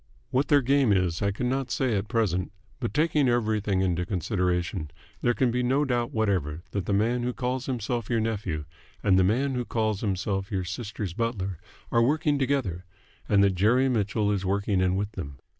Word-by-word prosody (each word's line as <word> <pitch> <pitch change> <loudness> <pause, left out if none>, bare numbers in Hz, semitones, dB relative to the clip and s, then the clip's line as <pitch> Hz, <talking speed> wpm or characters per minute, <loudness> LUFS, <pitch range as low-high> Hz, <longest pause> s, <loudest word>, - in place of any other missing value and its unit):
What 135 +3 +2
their 145 -2 +4
game 135 -2 +3
is 90 -4 +1
I 100 - +2
could 105 +5 -3
not 130 +1 -1
say 125 -2 0
at 100 +1 -1
present, 100 -7 0 0.3
but, 120 -3 -2
taking 150 -3 +2
everything 110 -5 +1
into 90 -2 +1
consideration, 90 -3 -1 0.3
there 120 -1 +2
can 125 -3 +2
be 125 +1 0
no 135 +4 +2
doubt 120 -3 0
whatever 90 -8 -1
that 100 -4 -3
the - - 0
man 115 +5 +2
who 125 +1 -1
calls 125 0 -2
himself 120 -3 -2
your 115 - +2
nephew 100 -9 -2 0.4
and 95 -2 +4
the - - +5
man 130 +8 +1
who 125 -1 -1
calls 110 -3 -1
himself 95 -1 -1
your 95 -3 -1
sister's 100 0 -5
butler 100 -6 -2 0.3
are 115 - +4
working 145 +3 +2
together, 125 -11 0 0.5
and 100 -1 +5
that 100 -1 +3
Jerry 115 +8 +3
Mitchell 105 -2 +1
is 100 -2 -1
working 100 0 +1
in 95 0 +2
with 100 +2 -2
them. 70 -9 -7
105 Hz, 190 wpm, -27 LUFS, 95-125 Hz, 0.5 s, the